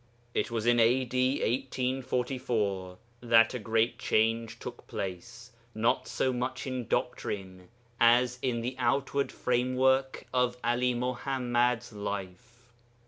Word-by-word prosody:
It - - 0
was 115 -2 -2
in 120 0 +4
A.D. 125 +2 +3 0.3
1844 125 -7 -2 0.2
that 115 -1 +5
a 125 - -3
great 115 +2 0
change 115 +1 +1
took - - -9
place, 100 +6 -6 0.2
not 110 +2 +1
so 130 - 0
much 125 +1 -3
in 130 -4 -4
doctrine 95 -2 -3 0.3
as 120 +1 +4
in 120 -3 -1
the 125 +2 -3
outward 135 +3 0
framework 130 +2 +1
of 125 -1 +1
Ali 120 +1 +1
Muḥammad's 125 -1 0
life. 105 +4 -7
120 Hz, 115 wpm, -29 LUFS, 115-125 Hz, 0.3 s, that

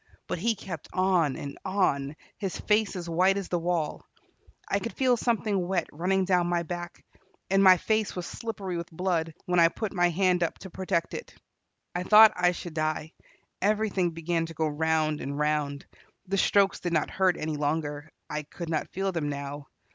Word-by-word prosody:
But - - -3
he 225 +4 +1
kept 180 -6 -7
on 180 -7 +2
and 140 -1 -7
on, 155 -7 0 0.2
his 195 -3 -3
face 210 -1 +1
as 175 -2 -5
white 185 +4 +3
as 195 -3 -4
the 175 - 0
wall. 170 -2 -1 0.6
I 200 - +1
could 230 +4 -5
feel 255 -2 +3
something 215 -6 0
wet 180 -3 0
running 185 +4 +1
down 180 -2 +2
my 175 -1 0
back, 175 +1 -7 0.5
and 195 0 +5
my 185 -1 +8
face 220 +2 0
was 180 -1 -4
slippery 195 -6 -5
with 170 0 -5
blood, 165 -2 -1
when 180 -1 +2
I 165 - +8
put 205 +5 -4
up - - -11
my 175 -1 +4
hand 180 0 +2 0.2
to 190 - -8
protect 180 -2 -1
it. - - -7 0.6
I 180 - -2
thought 215 +3 +8
I 180 0 +3
should 175 -1 -7
die; 155 0 -2 0.5
everything 205 -3 +1
began 165 0 -2
to 165 - -10
go 160 +1 0
round 155 0 0
and 140 +1 -4
round. 150 -1 -1 0.4
The 195 +1 -1
strokes 195 0 +3
did 175 -1 -3
not 155 - +1
hurt 185 -2 +2
any 155 0 -3
longer; 145 0 -2 0.2
I 150 - -3
could 160 +3 -8
not 155 - -1
feel 195 +1 -2
them 160 -5 -2
now. 140 0 -5
175 Hz, 190 wpm, -28 LUFS, 155-195 Hz, 0.6 s, my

